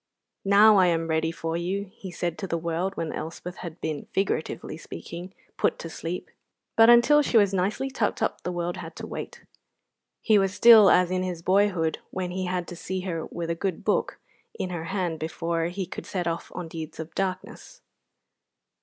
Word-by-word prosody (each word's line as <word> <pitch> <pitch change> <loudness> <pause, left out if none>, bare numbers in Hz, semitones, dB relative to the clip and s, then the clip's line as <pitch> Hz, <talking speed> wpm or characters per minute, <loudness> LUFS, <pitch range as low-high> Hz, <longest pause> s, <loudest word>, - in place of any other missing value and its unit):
"Now 205 +2 +7
I 185 -1 +5
am 165 -1 +1
ready 160 0 +1
for 165 0 -4
you," 185 +3 -3
he 195 - -9
said 175 -1 -3
to 195 - -4
the 170 - -1
world 170 +4 -2
when 160 - -3
Elspeth 170 +3 -6
had 170 -1 -8
been, 155 -2 -4
figuratively 195 0 -2
speaking, 170 - -8 0.3
put - - +1
to 165 - -7
sleep; 170 +3 -5 0.4
but 225 0 +7
until 240 +5 +7
she 255 -4 +2
was 200 -2 +4
nicely 200 +9 0
tucked 270 - -1
up - - -1
the 180 - -3
world 175 0 -3
had 165 -2 -8
to - - -7
wait. - - -7 0.8
He 215 -3 +5
was 195 0 0
still 220 -4 +9
as 180 0 +4
in 185 0 0
his 180 -3 -4
boyhood, 185 -4 +2
when 185 -1 -3
he 185 +1 -2
had 180 -1 -2
to 175 - -7
see 185 +2 -4
her 170 -4 -4
with 170 -1 -4
a - - +2
good 180 +1 -3
book - - 0 0.4
in 185 - -3
her 170 -2 -4
hand 175 -3 -2
before 165 +1 -2
he 180 +3 -3
could 175 - -8
set 180 -3 -2
off 170 0 -3
on 180 -2 -4
deeds 160 -1 -7
of 160 0 -7
darkness. 195 - -4
180 Hz, 195 wpm, -26 LUFS, 165-195 Hz, 0.8 s, still